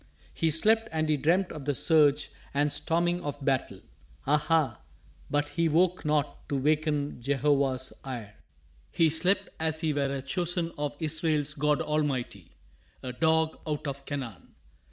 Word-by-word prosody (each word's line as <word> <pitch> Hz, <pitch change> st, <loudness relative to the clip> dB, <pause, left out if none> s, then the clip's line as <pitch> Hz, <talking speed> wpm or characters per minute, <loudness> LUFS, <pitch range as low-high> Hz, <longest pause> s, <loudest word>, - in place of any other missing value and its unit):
He 165 Hz, -, +1 dB
slept 220 Hz, +8 st, +3 dB
and 155 Hz, -1 st, 0 dB
he 155 Hz, -, +3 dB
dreamt 175 Hz, +6 st, +1 dB
of 145 Hz, -3 st, -7 dB
the 145 Hz, -1 st, 0 dB
surge 150 Hz, +1 st, +3 dB, 0.2 s
and 145 Hz, 0 st, +2 dB
storming 175 Hz, +4 st, +1 dB
of 145 Hz, -1 st, -5 dB
battle. 135 Hz, -2 st, 0 dB, 0.4 s
Ah 150 Hz, +2 st, +4 dB
ha! 150 Hz, -5 st, +1 dB, 0.5 s
but 145 Hz, 0 st, 0 dB
he 165 Hz, -1 st, +1 dB
woke 175 Hz, +3 st, +2 dB
not 150 Hz, -2 st, -1 dB
to 140 Hz, -, 0 dB
waken 150 Hz, -1 st, 0 dB
Jehovah's 135 Hz, -1 st, +1 dB
ire. 120 Hz, -6 st, -6 dB, 0.6 s
He 165 Hz, -2 st, +3 dB
slept 180 Hz, +5 st, +2 dB
as 160 Hz, 0 st, 0 dB
he 160 Hz, -3 st, +1 dB
were 140 Hz, -1 st, 0 dB
a 135 Hz, -1 st, -3 dB
chosen 170 Hz, +3 st, -1 dB
of 145 Hz, 0 st, -3 dB
Israel's 155 Hz, -2 st, 0 dB
God 150 Hz, -1 st, +1 dB
Almighty. 135 Hz, -, -2 dB, 0.5 s
A 125 Hz, -1 st, -4 dB
dog 160 Hz, +3 st, +2 dB
out 150 Hz, 0 st, -2 dB
of 140 Hz, -1 st, -4 dB
Canaan! 135 Hz, -7 st, -6 dB
150 Hz, 155 wpm, -28 LUFS, 140-160 Hz, 0.6 s, Ah